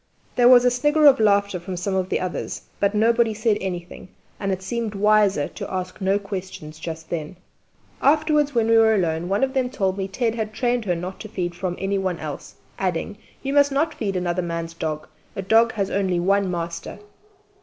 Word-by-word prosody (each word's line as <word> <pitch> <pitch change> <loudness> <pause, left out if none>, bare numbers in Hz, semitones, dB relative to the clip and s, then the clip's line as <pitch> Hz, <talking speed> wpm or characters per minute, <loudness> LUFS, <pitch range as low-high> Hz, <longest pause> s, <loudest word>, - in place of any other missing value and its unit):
There 245 0 +6
was 250 -1 +7
a 250 - +5
snigger 295 +5 +2
of 275 -4 +7
laughter 200 -3 +2
from 180 +1 -6
some 190 +3 -2
of 190 -1 -1
the - - 0
others, 185 -1 -4 0.2
but 200 +1 +1
nobody 225 +1 +3
said 215 -1 +1
anything, 180 -2 -6 0.3
and 195 -1 -1
it 190 0 -3
seemed 230 0 -3
wiser 205 -6 +3
to - - -7
ask 185 0 -4
no 195 +1 +2
questions 185 -6 -7
just 160 -1 -7
then. 160 0 -4 0.7
Afterwards, 300 -1 +3
when 230 -1 +2
we 225 0 +5
were 220 -1 +5
alone, 170 -2 -1
one 200 +6 +1
of 265 0 0
them 260 -2 0
told 195 -4 -1
me 190 - -2
Ted 225 +3 -1
had 220 -2 -4
trained 240 0 0
her 180 -3 +1
not 180 +3 -6
to 215 - -8
feed 180 -5 -3
from 175 0 -4
any 195 0 -1
one 185 -2 -1
else, 150 -3 -7 0.2
adding, 185 +2 -2 0.3
"You 275 0 -2
must 285 0 +4
not 305 +3 +1
feed 200 -4 -3
another 180 0 -1
man's 170 -1 -4
dog; 155 -2 -4 0.3
a 195 - -4
dog 225 +3 +4
has 200 -3 -2
only 190 -3 0
one 195 +2 +2
master!" 170 0 -4
195 Hz, 205 wpm, -23 LUFS, 180-230 Hz, 0.7 s, was